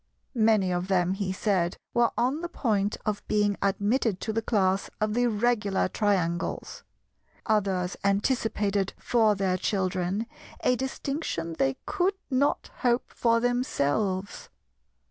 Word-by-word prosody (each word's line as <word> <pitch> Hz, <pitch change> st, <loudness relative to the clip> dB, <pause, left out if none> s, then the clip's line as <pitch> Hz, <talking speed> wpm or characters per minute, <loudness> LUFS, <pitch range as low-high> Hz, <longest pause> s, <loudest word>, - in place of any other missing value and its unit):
Many 215 Hz, -6 st, +3 dB
of 175 Hz, +1 st, -2 dB
them, 185 Hz, -1 st, +2 dB
he 195 Hz, -1 st, -2 dB
said, 185 Hz, -3 st, 0 dB, 0.2 s
were 240 Hz, 0 st, +4 dB
on 260 Hz, +6 st, +1 dB
the 345 Hz, -, -4 dB
point 210 Hz, -, 0 dB
of 210 Hz, -1 st, -1 dB
being 205 Hz, -1 st, +2 dB
admitted 205 Hz, +1 st, +1 dB
to 220 Hz, -, -2 dB
the 225 Hz, -, 0 dB
class 195 Hz, -4 st, +1 dB
of 215 Hz, 0 st, 0 dB
the 245 Hz, +1 st, +2 dB
Regular 215 Hz, -3 st, +1 dB
Triangles; 185 Hz, -5 st, -1 dB, 0.6 s
others 195 Hz, -4 st, +1 dB
anticipated 200 Hz, -1 st, +1 dB
for 220 Hz, -3 st, +2 dB
their 190 Hz, -2 st, 0 dB
children 185 Hz, +1 st, -1 dB, 0.4 s
a 250 Hz, -, +3 dB
distinction 265 Hz, -, -3 dB
they 135 Hz, 0 st, +1 dB
could 390 Hz, 0 st, +1 dB, 0.2 s
not 270 Hz, +2 st, +1 dB
hope 245 Hz, -1 st, 0 dB
for 230 Hz, -1 st, +2 dB
themselves. 200 Hz, -, -1 dB
205 Hz, 125 wpm, -27 LUFS, 190-235 Hz, 0.6 s, were